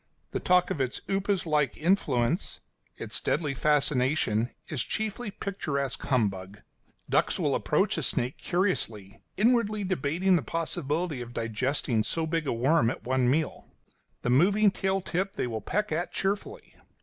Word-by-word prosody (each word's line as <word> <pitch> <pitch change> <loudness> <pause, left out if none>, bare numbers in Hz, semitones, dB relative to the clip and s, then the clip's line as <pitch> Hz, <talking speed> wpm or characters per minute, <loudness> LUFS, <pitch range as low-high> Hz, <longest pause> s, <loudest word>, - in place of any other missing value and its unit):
The - - -2
talk 180 0 +3
of 140 - -1
its 130 -1 -2
upas 195 -1 0
like 150 -5 +1
influence, 155 - +1 0.4
its - - -2
deadly 150 -4 0
fascination, 135 -5 +2 0.2
is 145 -6 -2
chiefly 220 +1 -3
picturesque 150 -9 -3
humbug. 100 -6 -1 0.5
Ducks - - +2
will - - +1
approach - - +1
a - - -2
snake 125 +3 -1
curiously, 115 - -1 0.2
inwardly 215 -1 +2
debating 180 +1 +1
the - - -1
possibility 160 0 -2
of 120 0 -8
digesting 115 +1 0
so 160 +8 -1
big 160 -1 -1
a - - +1
worm 130 +2 +3
at - - -5
one 130 0 +1
meal; 155 +3 -1 0.6
the 125 - +1
moving 195 +10 +4
tail 190 0 -1
tip 190 +2 -2
they - - -1
will 110 -3 -4
peck 210 - -1
at 170 +3 -1
cheerfully. 205 - -3
155 Hz, 150 wpm, -28 LUFS, 125-190 Hz, 0.6 s, moving